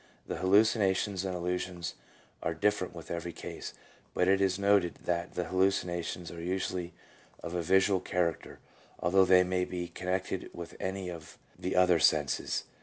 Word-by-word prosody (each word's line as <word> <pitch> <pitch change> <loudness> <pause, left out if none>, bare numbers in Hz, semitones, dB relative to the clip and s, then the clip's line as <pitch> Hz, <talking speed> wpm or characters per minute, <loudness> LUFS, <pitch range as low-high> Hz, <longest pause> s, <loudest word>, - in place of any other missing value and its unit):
The - - -4
hallucinations 100 -1 +3
and 95 -1 -2
illusions 90 0 -3 0.5
are 80 - -1
different 95 0 0
with 85 - -9
every 85 0 -3
case, - - -7 0.4
but 90 - +2
it 95 +1 +4
is 95 -1 +2
noted 100 -3 +3
that 85 0 -1
the 90 - 0
hallucinations 90 -2 0
are 85 - -8
usually 90 0 -3 0.5
of 85 - -5
a 90 - 0
visual 95 +2 +3
character, 90 -3 -2 0.4
although 95 +2 +4
they 90 0 +6
may 90 0 0
be 90 -1 -4
connected 95 +1 -3
with 85 -1 -8
any 95 -1 -3
of 80 -3 -10 0.2
the 90 - -3
other 90 -2 +5
senses. 75 -2 +2
90 Hz, 155 wpm, -31 LUFS, 85-95 Hz, 0.5 s, they